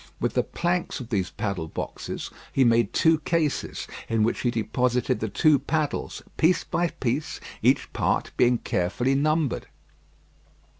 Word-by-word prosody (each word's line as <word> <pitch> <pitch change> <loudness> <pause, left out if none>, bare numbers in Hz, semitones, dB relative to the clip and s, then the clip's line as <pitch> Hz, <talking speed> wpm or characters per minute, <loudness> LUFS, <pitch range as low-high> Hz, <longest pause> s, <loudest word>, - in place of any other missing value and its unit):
With - - 0
the - - +3
planks 175 -1 -1
of 125 -3 -8
these 95 -5 0
paddle 95 -6 -3
boxes, - - -5 0.2
he 135 - +3
made 115 -1 +3
two 160 -1 +4
cases 155 -2 -1 0.2
in 115 -1 +2
which 115 - +1
he 125 - +1
deposited 120 +3 0
the 110 - -2
two 150 - +4
paddles, 155 -3 -2
piece 175 +3 +3
by 175 - 0
piece, 135 -1 -2 0.2
each - - +2
part - - 0
being 120 0 +4
carefully 115 +6 0
numbered. 155 0 +1
125 Hz, 145 wpm, -26 LUFS, 115-155 Hz, 0.2 s, two